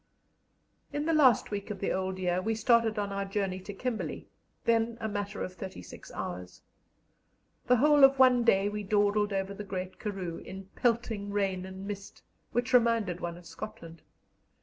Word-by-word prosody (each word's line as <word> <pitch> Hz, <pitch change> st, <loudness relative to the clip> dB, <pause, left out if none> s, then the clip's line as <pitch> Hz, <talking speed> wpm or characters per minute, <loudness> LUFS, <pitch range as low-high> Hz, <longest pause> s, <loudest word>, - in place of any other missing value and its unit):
In 290 Hz, +1 st, -2 dB
the 330 Hz, -, +2 dB
last 265 Hz, -10 st, +5 dB
week 200 Hz, +1 st, -4 dB
of 205 Hz, -2 st, -5 dB
the 195 Hz, -, -1 dB
old 190 Hz, 0 st, -2 dB
year 180 Hz, -1 st, 0 dB
we 225 Hz, +3 st, -1 dB
started 230 Hz, 0 st, +3 dB
on 205 Hz, -1 st, -1 dB
our 200 Hz, 0 st, -2 dB
journey 195 Hz, -1 st, -2 dB
to 190 Hz, +2 st, -8 dB
Kimberley, 225 Hz, +3 st, -4 dB, 0.4 s
then 230 Hz, 0 st, +2 dB
a 220 Hz, -, -2 dB
matter 205 Hz, 0 st, -3 dB
of 185 Hz, -, -5 dB
thirty 185 Hz, -, -8 dB
six -, -, -12 dB
hours. 90 Hz, 0 st, -6 dB, 1.0 s
The 250 Hz, -, +6 dB
whole 290 Hz, +3 st, +5 dB
of 270 Hz, 0 st, +7 dB
one 255 Hz, -2 st, +6 dB
day 195 Hz, -4 st, +4 dB
we 210 Hz, 0 st, -3 dB
dawdled 205 Hz, +1 st, +2 dB
over 195 Hz, 0 st, -2 dB
the 210 Hz, -, -7 dB
Great 185 Hz, -2 st, -5 dB
Karroo 190 Hz, -5 st, -4 dB
in 190 Hz, +1 st, -9 dB
pelting 225 Hz, -4 st, 0 dB
rain 195 Hz, -2 st, -1 dB
and 190 Hz, +1 st, -8 dB
mist, 200 Hz, -1 st, -7 dB, 0.3 s
which 245 Hz, +2 st, -1 dB
reminded 230 Hz, -7 st, +3 dB
one 170 Hz, -1 st, -4 dB
of 175 Hz, -, -14 dB
Scotland. 165 Hz, -4 st, -9 dB
205 Hz, 175 wpm, -30 LUFS, 190-230 Hz, 1.0 s, of